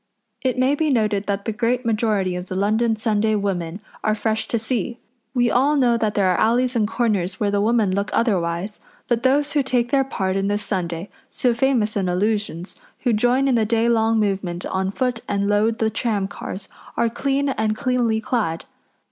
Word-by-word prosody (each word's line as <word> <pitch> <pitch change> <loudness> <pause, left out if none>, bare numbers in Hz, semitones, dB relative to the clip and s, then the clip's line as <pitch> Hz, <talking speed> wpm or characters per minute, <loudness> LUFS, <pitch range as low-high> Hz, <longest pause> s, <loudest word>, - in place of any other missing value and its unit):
It 255 -1 0
may 260 +2 +3
be 310 +1 +1
noted 210 -6 +1
that 200 -1 -2
the 225 - -1
great 245 +2 0
majority 215 -5 +1
of 180 +1 -5
the 185 - -5
London 220 +4 +2
Sunday 215 -1 +1
women 190 -3 -2 0.2
are 215 - +2
fresh 220 0 -1
to 235 - 0
see. 230 0 -2 0.4
We 245 -2 +3
all 280 +4 +3
know 250 -4 +3
that 220 -2 -1
there 195 -2 +3
are 180 - 0
alleys 245 +3 +2
and 215 -3 +2
corners 205 -5 -1
where 205 -2 +1
the 200 0 +1
women 220 -2 +2
look 200 +1 -1
otherwise, 190 -2 0 0.3
but 240 -1 +1
those 285 +3 +2
who 295 - +3
take 245 -2 0
their 275 -1 +4
part 190 -8 -2
in 195 0 0
this 205 +1 0
Sunday, 175 -1 -3 0.2
so 245 -2 +1
famous 240 -4 +1
in 190 -3 0
allusions, 200 -2 -1 0.2
who 245 -3 +1
join 245 +5 +2
in 265 - +3
the 230 -2 +3
day 225 +1 +1
long 225 -1 +3
movement 190 -4 -1
on 190 0 -1
foot 245 +2 -1
and 200 0 0
load 210 +2 +2
the 220 -1 0
tramcars, 205 -3 -3 0.3
are 235 - +3
clean 275 +4 0
and 220 -4 -1
cleanly 245 -4 +1
clad. 215 -8 -2
220 Hz, 195 wpm, -22 LUFS, 200-240 Hz, 0.4 s, their